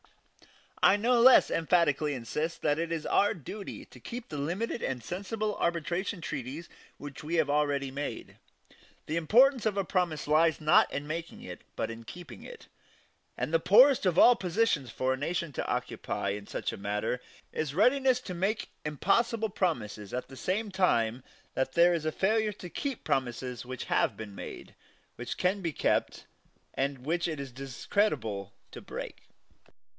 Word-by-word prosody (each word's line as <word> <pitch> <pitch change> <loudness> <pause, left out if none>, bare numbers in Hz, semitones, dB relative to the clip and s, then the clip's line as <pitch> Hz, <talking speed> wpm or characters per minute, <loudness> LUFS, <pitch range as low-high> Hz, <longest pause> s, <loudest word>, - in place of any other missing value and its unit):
I - - +6
no 235 +3 +3
less 255 +1 +7
emphatically 155 -3 +2
insist 150 +7 -3
that 150 0 +2
it 165 0 -2
is 165 -2 -2
our 205 - +3
duty 195 +6 -8
to - - -16
keep 245 0 -7
the 150 - -5
limited 185 +11 -2
and 125 -3 -3
sensible 205 - -3
arbitration 170 +3 -1
treaties 150 +2 -5 0.3
which 145 +1 -9
we 160 +3 -2
have 155 -4 +2
already 145 -2 +1
made. 140 +2 -5 0.7
The 155 - -3
importance 235 - +4
of 205 -2 -1
a 195 - +2
promise 175 -6 -1
lies 160 +2 +3
not 155 -1 +4
in 140 +1 -3
making 165 +2 -5
it, - - -8
but - - -2
in 115 0 -9
keeping 160 +1 -10
it; - - -11 0.7
and 155 - -3
the 165 - +5
poorest 245 - +6
of 175 -2 +1
all 245 - +8
positions 185 - 0
for 130 +3 0
a - - -3
nation 165 +2 -2
to - - -3
occupy 100 - -2
in 100 +1 -4
such - - -3
a - - -6
matter 105 +5 -2 0.3
is 150 -2 -3
readiness 260 +4 +4
to 190 - -6
make 200 +6 -1
impossible 220 - +1
promises 115 - -2
at 125 - -4
the 135 - -10
same 200 +9 -2
time 125 -11 +1 0.3
that 130 0 -1
there 175 +1 +5
is 160 -2 -1
failure 215 +2 +2
to 180 -3 -10
keep 275 -4 -4
promises 125 -1 -2
which 130 -1 -5
have 100 - +1
been 110 -2 -7
made, - - -9 0.4
which 120 - -5
can 190 +2 +1
be 170 -3 -1
kept, - - 0 0.5
and 135 -1 -2
which 170 +3 0
it 155 -3 -4
is 135 -2 -6
discreditable 130 - -1 0.2
to - - -9
break. - - -8
165 Hz, 170 wpm, -30 LUFS, 135-195 Hz, 0.7 s, all